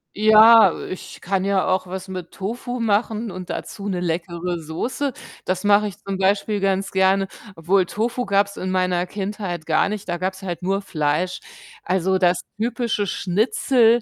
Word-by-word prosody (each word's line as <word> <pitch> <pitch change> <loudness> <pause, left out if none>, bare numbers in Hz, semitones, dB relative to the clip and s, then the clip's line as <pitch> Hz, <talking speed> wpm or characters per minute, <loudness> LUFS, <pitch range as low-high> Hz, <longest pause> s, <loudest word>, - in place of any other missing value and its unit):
Ja, 220 +2 +7 0.2
ich 185 - -8
kann 190 +1 -1
ja 195 -2 +1
auch 185 0 +1
was 190 +1 -6
mit 185 -2 -7
Tofu 240 +5 -5
machen 220 0 0
und 185 -1 -8
dazu 205 0 -6
'ne 185 -3 -1
leckere 170 0 -3
Soße. 240 - -3 0.3
Das 185 0 -1
mache 205 +1 +4
ich 190 - -8
zum 195 -1 -3
Beispiel 200 +2 +1
ganz 195 0 0
gerne 190 +1 +3 0.3
obwohl 180 +3 +2
Tofu 235 +6 -2
gab's 200 0 +1
in 185 0 -3
meiner 180 -1 +1
Kindheit 190 -4 -5
gar 160 +4 +2
nicht, 210 -2 -5
da 175 - -1
gab 185 +2 -2
es 190 - -13
halt 180 -3 -5
nur 195 +2 0
Fleisch. 155 +1 -1 0.4
Also, 190 +1 +1
das 180 -1 +2 0.2
typische 235 -2 -1
Schnitzel 225 +5 +2
195 Hz, 165 wpm, -22 LUFS, 180-210 Hz, 0.4 s, Ja